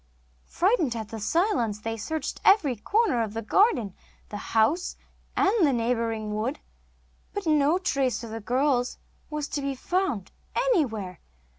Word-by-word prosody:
Frightened 350 Hz, -, +1 dB
at 220 Hz, -2 st, -5 dB
the 225 Hz, -, -6 dB
silence, 240 Hz, -, +1 dB
they 225 Hz, +1 st, -3 dB
searched 305 Hz, +7 st, -4 dB
every 335 Hz, -, +5 dB
corner 405 Hz, -, +1 dB
of 220 Hz, -1 st, -3 dB
the 225 Hz, -, -3 dB
garden, 240 Hz, -, +3 dB, 0.4 s
the 205 Hz, -, -5 dB, 0.2 s
house, 295 Hz, +12 st, +2 dB, 0.4 s
and 390 Hz, +1 st, +4 dB
the 290 Hz, -, +5 dB
neighbouring 230 Hz, -3 st, -1 dB
wood, 230 Hz, +7 st, -2 dB, 0.8 s
but 405 Hz, -2 st, -3 dB
no 305 Hz, +1 st, +3 dB
trace 270 Hz, -, 0 dB
of 230 Hz, -, -7 dB
the 225 Hz, 0 st, -5 dB
girls 250 Hz, +2 st, +1 dB, 0.3 s
was 300 Hz, -1 st, -3 dB
to 290 Hz, -, -2 dB
be 275 Hz, -1 st, -2 dB
found 300 Hz, -, -1 dB, 0.2 s
anywhere. 245 Hz, -, 0 dB
255 Hz, 145 wpm, -26 LUFS, 225-335 Hz, 0.8 s, every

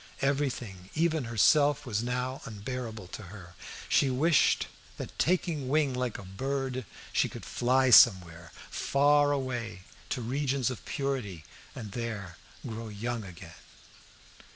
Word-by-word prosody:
Everything, 125 Hz, -9 st, -1 dB
even 160 Hz, -3 st, +1 dB
herself, 145 Hz, +5 st, +3 dB
was 110 Hz, -4 st, -1 dB
now 125 Hz, +2 st, -2 dB
unbearable 115 Hz, -1 st, -6 dB
to -, -, -7 dB
her. 90 Hz, -4 st, -11 dB, 0.3 s
She 140 Hz, -, +3 dB
wished 145 Hz, +4 st, +3 dB, 0.3 s
that, -, -, -6 dB
taking 160 Hz, -6 st, +1 dB
wing 145 Hz, -2 st, +2 dB
like 125 Hz, -2 st, -2 dB
a -, -, -9 dB
bird, 130 Hz, +4 st, -3 dB, 0.3 s
she -, -, +2 dB
could -, -, -9 dB
fly 130 Hz, +1 st, +2 dB
somewhere, 85 Hz, -6 st, +6 dB, 0.2 s
far 145 Hz, +1 st, +3 dB
away 120 Hz, -8 st, -3 dB, 0.3 s
to 125 Hz, -, -2 dB
regions 130 Hz, 0 st, 0 dB
of 125 Hz, -, -8 dB
purity, 125 Hz, -, -3 dB, 0.3 s
and 110 Hz, -4 st, -7 dB
there 105 Hz, -6 st, -5 dB, 0.3 s
grow 115 Hz, -2 st, -5 dB
young 115 Hz, +2 st, -4 dB
again. 90 Hz, -4 st, -11 dB
125 Hz, 130 wpm, -29 LUFS, 105-140 Hz, 0.3 s, somewhere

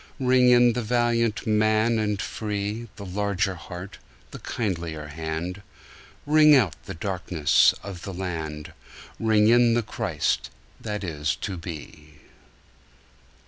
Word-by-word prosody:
Ring 125 Hz, -1 st, +4 dB
in 120 Hz, -1 st, +6 dB
the 125 Hz, -, -2 dB
valiant 115 Hz, -1 st, 0 dB
man 110 Hz, +1 st, +2 dB
and 105 Hz, -2 st, -1 dB
free, 105 Hz, +2 st, -4 dB
The 100 Hz, -, -9 dB
larger 100 Hz, +1 st, -1 dB
heart, 90 Hz, +2 st, -9 dB, 0.3 s
the -, -, -8 dB
kindlier 85 Hz, -8 st, -4 dB
hand; 80 Hz, +4 st, -4 dB, 0.6 s
Ring 150 Hz, 0 st, +6 dB
out 100 Hz, -, +3 dB
the -, -, -7 dB
darkenss 90 Hz, -4 st, +2 dB
of 95 Hz, -4 st, -7 dB
the 100 Hz, -, -6 dB
land, 80 Hz, -5 st, -5 dB, 0.5 s
Ring 110 Hz, -1 st, +3 dB
in 120 Hz, 0 st, +5 dB
the 120 Hz, -, +1 dB
Christ -, -, -2 dB, 0.3 s
that 105 Hz, -2 st, -4 dB
is 75 Hz, -4 st, -2 dB
to 100 Hz, -, -4 dB
be. 75 Hz, -3 st, -9 dB
100 Hz, 125 wpm, -25 LUFS, 85-115 Hz, 0.6 s, in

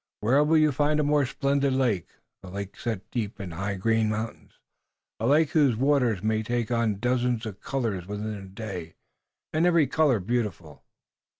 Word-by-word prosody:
Where 130 Hz, +7 st, +4 dB
will 160 Hz, +2 st, +3 dB
you 155 Hz, -1 st, +4 dB
find 150 Hz, +2 st, +1 dB
a -, -, +2 dB
more 145 Hz, -2 st, +2 dB
splendid 140 Hz, 0 st, +1 dB
lake, 120 Hz, -9 st, +1 dB, 0.3 s
a 95 Hz, -, -10 dB
lake 100 Hz, +1 st, -6 dB
set 110 Hz, -5 st, -5 dB
deep 110 Hz, -4 st, -3 dB
in 95 Hz, -3 st, -6 dB
high 100 Hz, +4 st, -3 dB
green 110 Hz, +3 st, +1 dB
mountains, 110 Hz, +1 st, -5 dB, 0.7 s
a 115 Hz, -, 0 dB
lake 150 Hz, +2 st, +4 dB
whose 145 Hz, -7 st, +4 dB
waters 125 Hz, -7 st, +2 dB
may 110 Hz, 0 st, +1 dB
take 120 Hz, +1 st, -2 dB
on 115 Hz, -2 st, +2 dB
a -, -, -8 dB
dozen 125 Hz, +2 st, 0 dB
colors 110 Hz, -2 st, -3 dB
within 105 Hz, +1 st, -4 dB
a 100 Hz, -2 st, -8 dB
day, 95 Hz, -5 st, -7 dB, 0.6 s
and 160 Hz, +3 st, +3 dB
every 170 Hz, -4 st, +4 dB
color 140 Hz, -3 st, +2 dB
beautiful?" 95 Hz, -7 st, -3 dB
115 Hz, 175 wpm, -26 LUFS, 100-140 Hz, 0.7 s, Where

